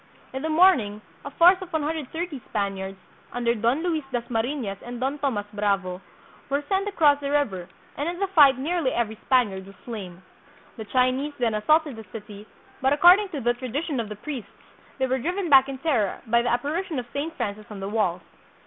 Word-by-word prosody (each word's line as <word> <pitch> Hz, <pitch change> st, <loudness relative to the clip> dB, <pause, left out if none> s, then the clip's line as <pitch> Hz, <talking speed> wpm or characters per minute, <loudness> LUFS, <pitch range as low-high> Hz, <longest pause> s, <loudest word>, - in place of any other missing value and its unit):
In 265 Hz, -, -4 dB
the 320 Hz, -, -2 dB
morning 310 Hz, -, +4 dB, 0.2 s
a -, -, -6 dB
force 355 Hz, +6 st, +5 dB
of 365 Hz, -1 st, -8 dB
130 315 Hz, 0 st, -3 dB
Spaniards, 195 Hz, -2 st, -3 dB, 0.3 s
under 240 Hz, -1 st, 0 dB
Don 235 Hz, +7 st, 0 dB
Luis 325 Hz, -4 st, 0 dB
Dasmarifias 235 Hz, -2 st, -2 dB
and 240 Hz, 0 st, -7 dB
Don 270 Hz, +3 st, -2 dB
Tomas 240 Hz, -8 st, -1 dB
Bravo, 195 Hz, -3 st, -1 dB, 0.5 s
were 280 Hz, +1 st, 0 dB
sent 390 Hz, +1 st, 0 dB
across 300 Hz, -8 st, +4 dB
the 280 Hz, -1 st, -4 dB
river, 200 Hz, -12 st, -1 dB, 0.3 s
and 290 Hz, +4 st, -1 dB
in 350 Hz, -, -4 dB
the 395 Hz, -, 0 dB
fight 295 Hz, -9 st, +6 dB
nearly 320 Hz, +1 st, 0 dB
every 230 Hz, -2 st, -1 dB
Spaniard 205 Hz, -8 st, +2 dB
was 195 Hz, -, -13 dB
slain. 190 Hz, -6 st, -7 dB, 0.5 s
The 220 Hz, -, -6 dB
Chinese 255 Hz, +5 st, +1 dB
then 235 Hz, -3 st, +1 dB
assaulted 295 Hz, +5 st, +2 dB
the 220 Hz, -, -8 dB
city, 210 Hz, 0 st, -9 dB, 0.3 s
but, 265 Hz, +1 st, +3 dB
according 360 Hz, +7 st, +6 dB
to 300 Hz, -6 st, -5 dB
the 240 Hz, +1 st, +2 dB
tradition 260 Hz, +4 st, -3 dB
of 225 Hz, -2 st, -3 dB
the 210 Hz, -, -6 dB
priests, 250 Hz, -1 st, -6 dB, 0.5 s
they 265 Hz, -, +1 dB
were 260 Hz, 0 st, 0 dB
driven 355 Hz, +6 st, -2 dB
back 270 Hz, 0 st, +7 dB
in 270 Hz, -, -5 dB
terror 255 Hz, -, 0 dB
by 235 Hz, +1 st, +3 dB
the 240 Hz, -, -1 dB
apparition 305 Hz, +8 st, -1 dB
of 250 Hz, -, -3 dB
Saint 305 Hz, +4 st, -3 dB
Francis 210 Hz, +1 st, -4 dB
on 210 Hz, -2 st, -8 dB
the 195 Hz, -, -4 dB
walls. 190 Hz, -5 st, 0 dB
260 Hz, 190 wpm, -25 LUFS, 215-305 Hz, 0.5 s, back